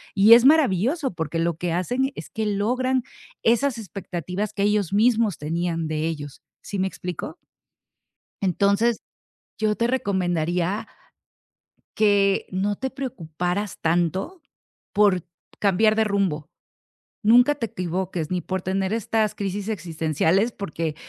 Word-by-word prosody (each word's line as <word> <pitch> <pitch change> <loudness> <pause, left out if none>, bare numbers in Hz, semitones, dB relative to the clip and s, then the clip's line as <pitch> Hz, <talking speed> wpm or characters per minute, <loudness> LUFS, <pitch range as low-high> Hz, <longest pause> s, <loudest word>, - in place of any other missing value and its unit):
y 205 +3 +8
es 235 +1 +8
maravilloso, 275 - +3
porque 160 -1 -3
lo 165 0 0
que 175 0 -2
hacen 245 +11 0
es - - -9
que 220 -1 -2
logran 250 +5 0 0.4
esas 240 +2 +2
expectativas 195 0 -5
que 200 - -1
ellos 205 -3 +1
mismos 220 -1 +3
tenían 165 +1 -2
de 155 0 -1
ellos, 145 -4 -6 0.2
¿sí 200 - -5
me 190 - +1
explicó? 185 - -6 1.0
Entonces 200 +4 +2 0.6
yo 215 -1 +1
te 235 - +1
recomendaría 180 -5 0 1.1
que 200 -2 +3
no 195 +2 0
te 265 - -3
preocuparas 185 - -4
tanto 175 - 0 0.5
por 200 -4 +3 0.4
cambiar 215 +2 +3
de 220 - +3
rumbo, 190 -7 -1 0.7
nunca 245 +6 +6
te 235 -5 -3
equivoques 180 -3 -3
ni 180 -1 0
por 190 +1 -3
tener 190 +2 -1
estas 220 -1 0
crisis 200 0 -3
existenciales, 170 +1 0
porque 165 -5 -4
200 Hz, 125 wpm, -24 LUFS, 175-220 Hz, 1.1 s, y